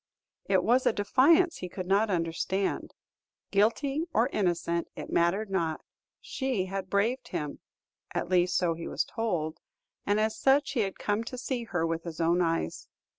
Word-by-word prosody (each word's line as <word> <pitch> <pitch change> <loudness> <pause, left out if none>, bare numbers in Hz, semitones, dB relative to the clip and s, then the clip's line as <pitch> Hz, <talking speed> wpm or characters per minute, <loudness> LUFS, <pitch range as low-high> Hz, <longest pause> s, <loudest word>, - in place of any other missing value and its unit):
It 190 -2 +2
was 245 +5 +3
a - - +4
defiance 315 - +4
he 180 - -6
could 185 +1 -5
not 200 +4 +2
withstand. 180 +2 -1 0.6
Guilty 270 +9 +2
or 235 +4 +3
innocent, 170 -5 0
it - - -7
mattered 195 +5 +1
not; 165 -5 -1 0.4
she 260 -8 -2
had 190 0 -5
braved 225 +7 0
him, 150 -1 -4 0.6
at - - -1
least 180 0 +2
so 175 -2 +2
he 165 0 -7
was - - 0
told, 170 -8 -2 0.5
and 205 +1 +3
as 220 0 +1
such 275 +5 +3
he 265 - -1
had 195 -3 -1
come 210 +2 -1
to 255 - -6
see 245 -1 -3
her 175 -6 -1
with 165 0 -1
his 170 -2 -7
own 170 +2 +3
eyes. 165 - -1
195 Hz, 170 wpm, -29 LUFS, 170-230 Hz, 0.6 s, a